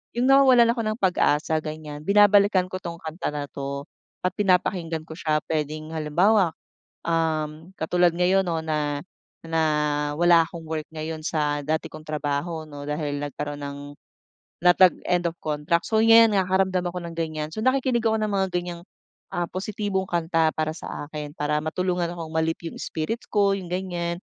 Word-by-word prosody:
yung 240 +1 +1
nawawalan 260 -3 +6
ako 235 -1 -2
ng 215 0 -1
pag-asa 160 -5 +2
ganyan. 155 -1 -7
Binabalikan 200 -2 +5
ko 185 - -4
'tong 170 -2 -6
kanta 160 +3 -4
na 150 -1 -3
'to, 140 0 -5 0.4
at 180 - +1
pinapakinggan 180 -4 0
ko - - -8
siya 155 -2 0
puwedeng 155 0 -3
halimbawa, 170 +5 +3 0.5
um, 160 -1 -1
katulad 175 +1 +2
ngayon 180 +2 +3
'no 165 -2 -1
na 150 -1 -1 0.4
na 165 0 0 0.5
wala 170 0 +5
akong 170 -2 -9
work 155 -1 -4
ngayon 155 0 -4
sa 150 -2 0
dati 155 0 -1
kong 155 0 -11
trabaho 150 +2 -2
'no 145 -2 -9
dahil 150 -1 -2
nagkaron 145 0 -5
ng, 140 0 -6 0.8
na 180 +1 +6
tag 185 -1 +5
end 180 -1 +1
of 165 - -18
contract. 155 +3 -1
So 220 -1 +2
'yan 225 -1 +7
nakakaramdam 190 -1 +1
ako 180 - -5
ng 170 - -8
ganyan. 155 -2 -3
So 215 - -4
nakikinig 260 -1 +2
ako 220 -1 +2
ng 215 -1 -1
mga 195 -1 +2
ganyang, 175 -1 -4 0.5
ah, 175 0 -1
positibong 190 0 -3
kanta 165 -1 +2
para 155 0 -2
sa 160 - -7
akin. 150 0 -7
Para 150 +1 0
matulungan 175 +2 -1
akong 165 -2 -7
ma-lift 165 +1 -1
yung - - -6
spirits 165 +9 -4
ko 200 -1 +3
yung 185 -3 -6
ganyan, 175 -2 -2
165 Hz, 170 wpm, -24 LUFS, 155-190 Hz, 0.8 s, yan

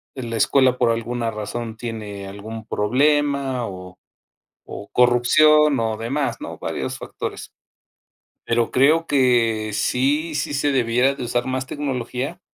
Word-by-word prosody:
en 125 -3 -6
la 115 - -2
escuela 130 +2 +3
por 120 -2 +3
alguna 115 0 -1
razón 110 +1 -5
tiene 105 -4 -6
algún 110 +3 -8
problema 135 +2 +1
o 90 -1 -10 0.7
o 100 - -8
corrupción 140 +4 +4
o 110 -1 -1
demás, 135 +6 -2
¿no?, - - -7
varios - - -4
factores. - - -7 0.9
Pero 115 -1 +1
creo 155 +6 +4
que 115 -5 +2
sí, 145 +8 0
sí 145 0 -2
se 145 0 +1
debiera 125 +2 +2
de 130 - -6
usar 120 0 -1
más 130 0 -2
tecnología. 135 +2 -4
125 Hz, 135 wpm, -21 LUFS, 115-140 Hz, 0.9 s, corrupción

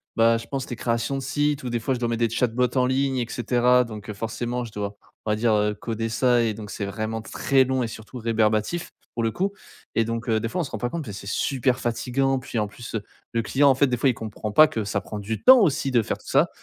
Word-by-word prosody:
bah, 115 0 +4
je 115 - -7
pense, 135 -2 -4
les 120 - -3
créations 115 +3 -1
de - - -3
sites 145 +1 0
où, 125 - -3
des 120 - 0
fois, 130 +4 -1
je 120 - -5
dois 120 - 0
mettre 115 -1 -1
des - - -8
chatbots 125 +2 0
en 125 - +4
ligne, 135 0 +1
et 120 - 0
cetera. 125 +1 +3
Donc 110 -2 -7
forcément, 120 +3 -3
je 115 - -10
dois, 100 0 -4 0.3
on 110 - 0
va - - +2
dire, 110 +1 +2
heu, 105 0 +2
coder 115 +1 -4
ça 120 +1 +3
et 110 - 0
donc 105 -1 -8
c'est 100 - -4
vraiment 110 +3 -3
très 135 +4 +2
long 130 0 0
et 120 - 0
surtout 110 +3 -9
rébarbatif, 110 +7 0 0.2
pour 120 - -2
le 115 - +2
coup. 195 - -1 0.4
Et 115 - +2
donc 115 +2 -3
heu, 110 -2 +2
des 115 +1 -3
fois 180 - -1
on - - 0
se 145 - -7
rend - - -4
pas 120 - -1
compte. 165 +4 -4
Beh, 105 - -6
c'est 100 0 -8
super 130 +2 0
fatigant. 130 +3 0
Puis, 125 - -6
en 105 -1 +1
plus, 115 +3 -9 0.4
le 115 - +1
client, 135 +8 +4
en 135 - +5
fait, 140 - +4
des 125 - 0
fois, 135 +4 +3
il 125 - 0
comprend 110 -1 -5
pas 155 +9 +8
que 110 -6 -3
ça 100 0 -1
prend 105 +3 -7
du 105 +2 -4
temps 260 0 +9
aussi 160 - +2
de 120 -2 +4
faire - - -3
tout - - -19
ça. - - +3
115 Hz, 280 wpm, -24 LUFS, 110-130 Hz, 0.4 s, temps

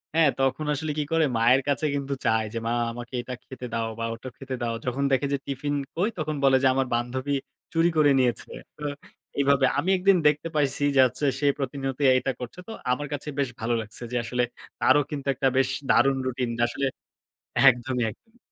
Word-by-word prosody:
হ্যাঁ, 160 -3 +5
তখন 135 +3 +1
আসলে 150 +2 -2
কি 150 - +1
করে? 165 -1 +3
মায়ের 120 +4 +5
কাছে 145 +2 +1
কিন্তু 140 0 -2
চায় 110 0 +3
যে, - - -3
"মা - - 0 0.2
আমাকে 120 +1 -9
এটা 125 - -7
খেতে 130 -1 -9
দাও 115 -1 0
বা 115 - -1
ওটা 120 +3 -8
খেতে 135 -1 -5
দাও।" 115 -1 -1
যখন 130 +3 -1
দেখে 135 +1 +2
যে, - - +2
"টিফিন 145 +1 -2 0.2
কই?" 190 +7 +1
তখন 155 -1 -2
বলে 135 -1 +6
যে, - - +6
"আমার 135 -1 +1
বান্ধবী 130 +4 -2 0.4
চুরি 165 +1 +4
করে 150 -2 +5
নিয়েছে।" 125 -2 0 0.3
তো 150 - -10 0.5
এইভাবে। 140 -1 +4
আমি 165 +6 0
একদিন 185 0 +4
দেখতে 150 +2 +1
পাইছি 145 -1 +1
যে - - +4
আচ্ছা, 125 +4 -4
সে 145 - -1
প্রতিনিয়তই 135 0 -1
এটা 135 - -1
করছে। 125 +8 -7
তো - - -7 0.2
আমার 145 +3 -1
কাছে 145 +1 -5
বেশ 135 -3 +1
ভালো 115 +1 0
লাগছে 110 +3 -9
যে, 125 - -3
আসলে 125 +1 0 0.4
তারও 145 +3 +5
কিন্তু 140 -2 -5
একটা 135 +1 +1
বেশ 135 0 +3 0.2
দারুণ 135 0 +4
রুটিন, 125 -1 -1 0.2
আসলে 135 +3 -2 0.8
একদমই, 125 0 +1
একদমই। 225 - -19
135 Hz, 200 wpm, -26 LUFS, 125-145 Hz, 0.8 s, বলে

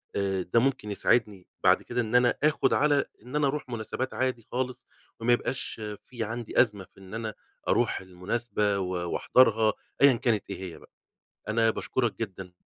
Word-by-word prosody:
آآ، 95 -1 0
ده 90 +6 +2
ممكن 130 -5 0
يساعدني 105 -2 +1 0.2
بعد - - +5
كده 120 0 -1
إن 115 +1 -2
أنا 125 0 +4
آخد 150 -3 +3
على 145 -1 +3 0.2
إن 125 +4 -8
أنا 150 -2 +3
أروح 140 -2 -3
مناسبات 120 +3 -3
عادي 130 -2 -1
خالص، 125 0 -3 0.3
وما 120 +2 +3
يبقاش 120 -2 -2 0.2
في 120 -3 -5
عندي 115 +2 +1
أزمة 105 -5 0
في 95 - -20
إن 95 +1 -12
أنا 110 -1 -3 0.3
أروح - - +2
المناسبة 100 +3 -1
و 95 -1 -2 0.2
وأحضرها 115 -4 +4 0.3
أيًا 140 -1 +8
كانت 115 -3 +1
إيه - - -5
هي - - -11
بقى. - - -19 0.6
أنا 115 +1 +3
باشكرك 120 0 -1
جدًا 95 -4 -5
115 Hz, 170 wpm, -28 LUFS, 105-125 Hz, 0.6 s, أيًا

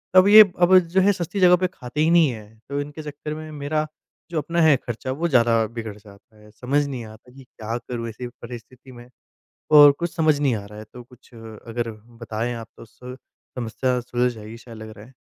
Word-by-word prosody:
अब 185 +1 +7
ये 215 +1 +10 0.2
अब 185 +1 +6
जो 180 +2 0
है 200 +2 +4
सस्ती 180 +3 -5
जगह 180 -1 +6
पे 185 0 0
खाते 130 +4 -5
ही 160 - +3
नहीं 165 -4 +5
हैं। 110 -1 -12
तो 140 0 -3
इनके 150 +2 -8
चक्कर 150 +1 -7
में 155 0 -8
मेरा 155 +1 -2 0.4
जो 165 - -3
अपना 170 +3 -1
है 155 -3 +6
ख़र्चा 120 +2 -5
वो 165 +6 -2
ज़्यादा 115 -5 +3
बिगड़ 110 -2 -7
जाता 105 +1 -19
है। 105 0 -18
समझ 140 +6 -1
नहीं 130 -4 -6
आता 110 +3 -15
कि 135 0 -14
क्या 115 -1 -6
करूँ 120 -1 -6
ऐसी 120 +3 -7
परिस्थिति 120 +2 -12
में? 120 0 -14 0.6
और 145 -1 +9
कुछ 170 -1 -4
समझ 155 -3 +2
नहीं 135 -5 +1
आ 100 - -7
रहा 105 +1 -12
है। 110 - -9
तो 125 - -9
कुछ 125 +1 -21
अगर 115 +1 -6 0.3
बताए 115 +2 -3
आप 115 -1 -8
तो - - -12
सु 125 +3 -12 0.4
समस्या 125 +2 -1
सुलझ 125 +1 -1
जाएगी 110 0 -10
शायद 115 -2 -13
लग 110 0 -9
रहा 105 +2 -13
है। 130 - -19
125 Hz, 220 wpm, -22 LUFS, 115-150 Hz, 0.6 s, ये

